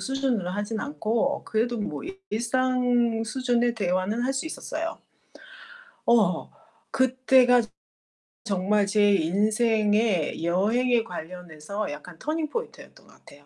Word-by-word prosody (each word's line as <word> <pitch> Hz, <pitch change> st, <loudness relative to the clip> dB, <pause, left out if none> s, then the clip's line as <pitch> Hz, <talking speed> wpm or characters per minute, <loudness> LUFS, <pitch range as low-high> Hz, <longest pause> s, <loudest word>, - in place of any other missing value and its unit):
수준으로 265 Hz, -9 st, -1 dB
하진 205 Hz, +3 st, -3 dB
않고 275 Hz, -1 st, -1 dB
그래도 230 Hz, +2 st, -1 dB
뭐 205 Hz, -, -4 dB
일 380 Hz, +3 st, -8 dB
일상 245 Hz, -1 st, +1 dB
수준의 240 Hz, 0 st, 0 dB
대화는 190 Hz, +3 st, -1 dB
할 260 Hz, +2 st, 0 dB
수 270 Hz, +4 st, -3 dB
있었어요. 325 Hz, +1 st, -5 dB, 1.1 s
어 215 Hz, -7 st, +2 dB, 0.4 s
그때가 255 Hz, -1 st, +4 dB, 0.8 s
정말 200 Hz, 0 st, +1 dB
제 205 Hz, 0 st, +4 dB
인생의 210 Hz, 0 st, +1 dB
여행에 225 Hz, +7 st, +2 dB
관련해서 180 Hz, 0 st, -6 dB
약간 165 Hz, +3 st, -10 dB
터닝 310 Hz, 0 st, -2 dB
포인트였던 465 Hz, +7 st, -7 dB
것 -, -, -19 dB
같아요. 145 Hz, 0 st, -18 dB
225 Hz, 255 characters per minute, -26 LUFS, 200-255 Hz, 1.1 s, 그때가